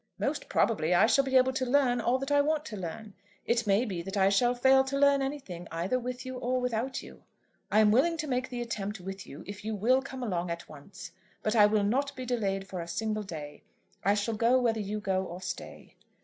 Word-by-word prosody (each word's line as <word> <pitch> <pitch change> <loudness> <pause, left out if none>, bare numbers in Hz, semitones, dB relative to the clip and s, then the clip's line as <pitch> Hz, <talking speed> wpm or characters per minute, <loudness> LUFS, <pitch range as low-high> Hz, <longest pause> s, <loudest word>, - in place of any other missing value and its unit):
"Most - - -2
probably 180 -6 +2
I 195 - +6
shall 275 +4 +4
be 265 -1 +3
able 260 +1 +4
to 260 - -1
learn 250 -2 +2
all 240 +3 +2
that 270 +2 -4
I 285 0 +5
want 305 +1 0
to 225 - -6
learn. 200 +3 -7 0.3
It 235 -1 +1
may 200 +5 +3
be 185 -7 -4
that 195 +4 -5
I 190 0 +4
shall 240 +5 +3
fail 265 +2 +5
to 275 +1 -2
learn 280 0 +4
anything 260 -12 -5
either 175 +10 -1
with 250 +1 -5
you 255 -1 -5
or 255 +1 0
without 250 +1 -2
you. - - -13 0.5
I 215 - +5
am 210 -1 +5
willing 330 +9 +3
to 305 -1 -3
make 255 -1 -1
the 245 -1 -3
attempt 210 -3 -4
with 190 +1 -7
you 140 - -10
if 200 +1 -8
you 220 0 -3
will 250 +6 +3
come 265 -1 -7
along 180 -6 -2
at 170 0 -5
once; 150 +5 -11 0.3
but 215 +2 0
I 210 -2 +7
will 210 -1 +2
not 275 +7 0
be 255 0 -6
delayed 195 -6 -1
for 185 -3 -5
a 170 - -7
single 215 +4 -2
day. 155 -7 -8 0.4
I 200 +2 +3
shall 210 +2 -1
go 235 +4 +3
whether 230 -3 +1
you 210 +1 -3
go 190 -2 0
or 180 -1 -7
stay." 185 -1 -7
225 Hz, 235 wpm, -29 LUFS, 195-255 Hz, 0.5 s, I